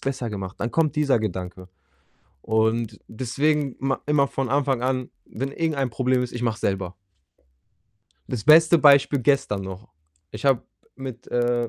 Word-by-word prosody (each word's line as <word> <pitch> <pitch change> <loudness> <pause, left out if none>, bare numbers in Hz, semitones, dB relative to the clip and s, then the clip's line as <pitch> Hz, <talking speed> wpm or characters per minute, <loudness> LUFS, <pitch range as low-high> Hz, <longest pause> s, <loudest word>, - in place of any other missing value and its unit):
besser 130 -4 -3
gemacht.“ 95 -2 -6
Dann 115 - -2
kommt 155 +2 +1
dieser 140 -5 +3
Gedanke 90 -3 -5 0.7
und 110 0 0
deswegen 140 +4 -1
ma 135 +1 -1
immer 145 -1 +3
von 135 -1 -3
Anfang 135 -3 +1
an, 130 0 -1 0.2
wenn 135 +4 -5
irgendein 145 -5 -1
Problem 125 +1 +1
ist, 125 - -5
ich 120 - -5
mache 115 -2 +1
es 115 - -14
selber. 95 -2 -2 1.3
Das 120 -5 -4
beste 160 +2 +7
Beispiel 140 -1 +5
gestern 120 -6 +1
noch, 95 +3 -8 0.4
ich - - -9
habe 135 -3 +3 0.3
mit, 130 -3 -8
äh, 120 -1 0
125 Hz, 155 wpm, -24 LUFS, 110-140 Hz, 1.3 s, beste